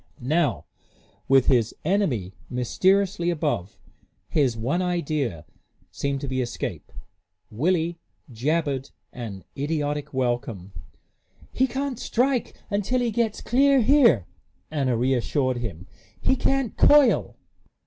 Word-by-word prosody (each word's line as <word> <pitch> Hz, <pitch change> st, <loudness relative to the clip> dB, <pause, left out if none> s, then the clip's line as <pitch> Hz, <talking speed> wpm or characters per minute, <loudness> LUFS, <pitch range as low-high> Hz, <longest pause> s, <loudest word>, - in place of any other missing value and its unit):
Now, 150 Hz, +5 st, 0 dB, 0.6 s
with 135 Hz, -1 st, +5 dB
his 120 Hz, -5 st, +2 dB
enemy 150 Hz, -, 0 dB, 0.2 s
mysteriously 185 Hz, -, +1 dB
above, 150 Hz, -, -2 dB, 0.5 s
his 135 Hz, -7 st, +1 dB
one 135 Hz, +11 st, 0 dB
idea 150 Hz, -, -2 dB, 0.5 s
seemed 140 Hz, -1 st, -2 dB
to 140 Hz, -, -4 dB
be 130 Hz, -1 st, -1 dB
escape. 120 Hz, -1 st, -5 dB, 0.6 s
Willie 165 Hz, +7 st, 0 dB, 0.3 s
jabbered 140 Hz, +2 st, -1 dB, 0.2 s
an 105 Hz, -6 st, -7 dB
idiotic 145 Hz, 0 st, -2 dB
welcome. 120 Hz, -7 st, -2 dB, 0.8 s
"He 260 Hz, -, +2 dB
can't 265 Hz, 0 st, -3 dB
strike 250 Hz, +1 st, 0 dB, 0.2 s
until 205 Hz, +5 st, 0 dB
he 240 Hz, -2 st, 0 dB
gets 220 Hz, -1 st, -1 dB
clear 275 Hz, +2 st, +4 dB
here," 230 Hz, -, +5 dB, 0.5 s
Anna 135 Hz, -6 st, 0 dB
reassured 130 Hz, +1 st, 0 dB
him. 95 Hz, -7 st, -6 dB, 0.3 s
"He -, -, +2 dB
can't 270 Hz, -3 st, 0 dB
coil." 290 Hz, -4 st, +5 dB
145 Hz, 105 wpm, -24 LUFS, 125-200 Hz, 0.8 s, with